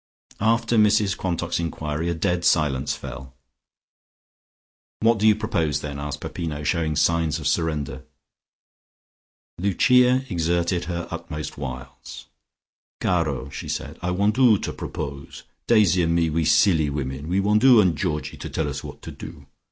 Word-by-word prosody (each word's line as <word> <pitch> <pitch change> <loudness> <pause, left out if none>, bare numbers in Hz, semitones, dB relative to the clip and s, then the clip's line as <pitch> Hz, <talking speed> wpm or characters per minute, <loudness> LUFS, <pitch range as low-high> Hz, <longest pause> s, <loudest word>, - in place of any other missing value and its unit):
After 115 +2 +2
Mrs 105 -2 +3
Quantock's 90 -2 -2
enquiry 80 -1 -3
a 85 - -1
dead 90 +1 -1
silence 70 -5 +1
fell. 65 -1 -9 1.7
"What 115 0 +3
do 110 - +3
you 105 - +6
propose, 85 -9 -1
then?" 70 -1 -6
asked 75 0 -5
Peppino, 80 -2 -5
showing 80 -1 0
signs 80 0 +1
of 80 - -8
surrender. 70 -4 -1 1.6
Lucia 125 +7 +3
exerted 85 -1 0
her 85 0 -4
utmost 75 0 -6
wiles. 65 -1 -8 0.7
"Caro!" 75 -6 -1
she - - -7
said. - - -5
"I 90 - -2
want 100 +6 +1
'oo 120 -5 +6
to - - -5
propose. 70 -2 -7 0.2
Daisy 100 -6 +4
and 85 0 +1
me, 85 -2 +1
we 80 +1 0
silly 80 -4 +4
women, 70 0 -4
we 90 +3 +1
want 105 +3 +2
'oo 130 -4 +8
and 90 -6 +3
Georgie 75 -3 -3
to - - -7
tell 80 - -2
us 70 0 -5
what - - -10
to - - -7
do. - - -10
85 Hz, 150 wpm, -23 LUFS, 75-100 Hz, 1.7 s, oo